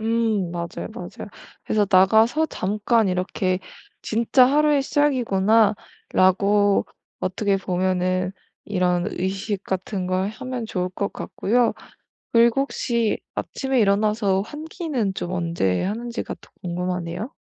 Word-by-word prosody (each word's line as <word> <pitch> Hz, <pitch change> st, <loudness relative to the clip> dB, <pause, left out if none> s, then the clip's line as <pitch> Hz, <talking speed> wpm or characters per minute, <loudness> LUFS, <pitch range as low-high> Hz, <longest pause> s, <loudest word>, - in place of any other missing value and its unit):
음 220 Hz, -4 st, 0 dB
맞아요, 170 Hz, 0 st, -5 dB
맞아요. -, -, -8 dB, 0.4 s
그래서 210 Hz, -2 st, +1 dB
나가서 220 Hz, +11 st, +5 dB
잠깐 210 Hz, +1 st, +1 dB
이렇게 185 Hz, 0 st, -1 dB, 0.4 s
'진짜 235 Hz, +3 st, +4 dB
하루의 295 Hz, 0 st, +3 dB
시작이구나.'라고 205 Hz, -6 st, +2 dB, 0.3 s
어떻게 195 Hz, +2 st, 0 dB
보면은 185 Hz, 0 st, 0 dB, 0.3 s
이런 180 Hz, -3 st, 0 dB
의식 195 Hz, +2 st, -3 dB
같은 185 Hz, 0 st, -3 dB
걸 185 Hz, +2 st, 0 dB
하면 250 Hz, +1 st, -5 dB
좋을 180 Hz, -4 st, -2 dB
것 200 Hz, +2 st, -3 dB
같고요. 240 Hz, +3 st, 0 dB, 0.6 s
그리고 235 Hz, +3 st, +4 dB
혹시 235 Hz, -5 st, -1 dB, 0.2 s
아침에 265 Hz, -2 st, -1 dB
일어나서 205 Hz, -1 st, +2 dB
환기는 295 Hz, -, -3 dB
좀 180 Hz, -1 st, -4 dB
언제 165 Hz, -, 0 dB
하는지가 235 Hz, +5 st, -4 dB
더 -, -, -18 dB
궁금하네요. 180 Hz, +3 st, -3 dB
205 Hz, 270 characters per minute, -23 LUFS, 185-235 Hz, 0.6 s, 나가서